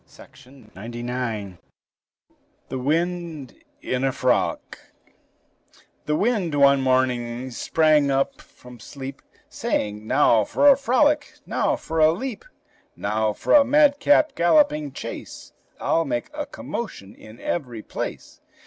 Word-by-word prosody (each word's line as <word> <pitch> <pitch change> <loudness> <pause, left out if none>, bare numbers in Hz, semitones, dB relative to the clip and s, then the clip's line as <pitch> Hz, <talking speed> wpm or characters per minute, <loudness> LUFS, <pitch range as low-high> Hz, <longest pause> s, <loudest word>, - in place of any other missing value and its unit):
REGINALD 125 -4 -17 0.2
HEBER 120 -6 -4 1.1
THE 130 - -4
WIND 165 +1 -2 0.3
IN 125 +1 -2
A 135 - +2
FROLIC - - -1 1.3
The 150 - +1
wind 195 -5 0
one 140 -1 +5
morning 130 -1 0
sprang 155 +2 +2
up 135 0 0
from 125 -1 -16
sleep, 135 +3 -9 0.3
Saying, 105 +1 -3
"Now 110 -1 +4
for 285 - +2
a 280 - +9
frolic! 290 +3 +1
now - - 0
for 165 0 -4
a 155 0 +6
leap! 240 +5 -5 0.5
Now 110 +1 -1
for - - -1
a 290 - +8
madcap 290 +1 +4
galloping 170 - +2
chase! - - -8 0.3
I'll 165 - +1
make 120 - -3
a 295 -1 -5
commotion 105 - -7
in 110 +2 -15
every 120 -9 -4
place!" - - -7
140 Hz, 120 wpm, -23 LUFS, 120-185 Hz, 1.3 s, a